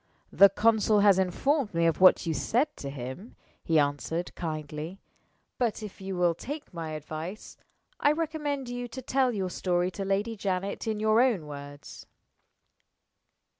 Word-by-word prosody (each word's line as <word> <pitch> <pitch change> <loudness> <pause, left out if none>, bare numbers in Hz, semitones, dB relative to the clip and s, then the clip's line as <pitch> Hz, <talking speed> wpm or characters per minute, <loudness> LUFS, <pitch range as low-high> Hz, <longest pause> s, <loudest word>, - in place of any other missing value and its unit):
"The 200 - +7
consul 215 0 +3
has 200 -2 +5
informed 215 - 0
me 170 0 +2
of 165 +1 +1
what 185 0 +7
you 165 - 0
said 245 - 0
to 140 - -6
him," 135 - -8 0.3
he 165 - +2
answered, 150 +4 -1
kindly. 155 +2 -5 0.6
"But, 230 -3 0
if 205 -1 -9
you 190 -1 -4
will 175 -1 +3
take 290 - -7
my 165 -2 -5
advice, 155 +6 -7 0.4
I 290 - +4
recommend 300 -4 -2
you 245 0 -4
to 260 +2 -8
tell 260 0 +2
your 190 -5 -2
story 180 0 0
to 195 - -5
Lady 200 +4 -1
Janet 195 +1 -3
in 215 -1 -1
your 215 +2 +4
own 230 -11 +2
words." 145 -1 -10
195 Hz, 155 wpm, -28 LUFS, 165-230 Hz, 0.6 s, The